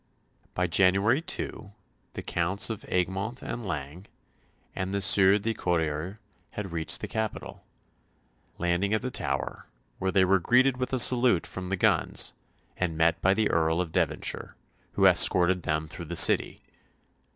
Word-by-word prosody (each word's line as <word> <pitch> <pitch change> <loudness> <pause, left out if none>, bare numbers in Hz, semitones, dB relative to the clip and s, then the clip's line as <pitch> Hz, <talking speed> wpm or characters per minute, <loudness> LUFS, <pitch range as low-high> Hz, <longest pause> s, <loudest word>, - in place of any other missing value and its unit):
By 90 - 0
January 95 - +2
2 105 -10 -5 0.4
the - - -6
Counts 90 +6 0
of 110 - -7
Egmont 95 +7 -3
and 120 - -6
Laing 75 +3 -7 0.7
and 95 +1 -4
the - - -1
Sieur 95 0 +5
de 115 +2 -3
Corriers 85 0 -3 0.4
had 100 -4 -6
reached 80 -1 0
the - - -5
capital; 110 -1 -6 0.9
landing 90 +4 -1
at 110 - -4
the 130 - -4
Tower, - - -4 0.3
where 95 - -2
they 95 0 +3
were 95 +1 +2
greeted 125 +7 +2
with 125 0 -4
a 130 - -1
salute 120 -7 +4
from 90 +1 -8
the 95 - -2
guns, - - 0 0.4
and 85 -3 -3
met 80 +1 +1
by 95 +1 +2
the 110 0 0
Earl 80 0 0
of 90 -3 -3
Devonshire, - - -3 0.4
who - - +1
escorted 90 0 +5
them 80 0 -2
through 85 +3 -9
the 85 +2 -7
City. - - +5
95 Hz, 155 wpm, -26 LUFS, 85-105 Hz, 0.9 s, Sieur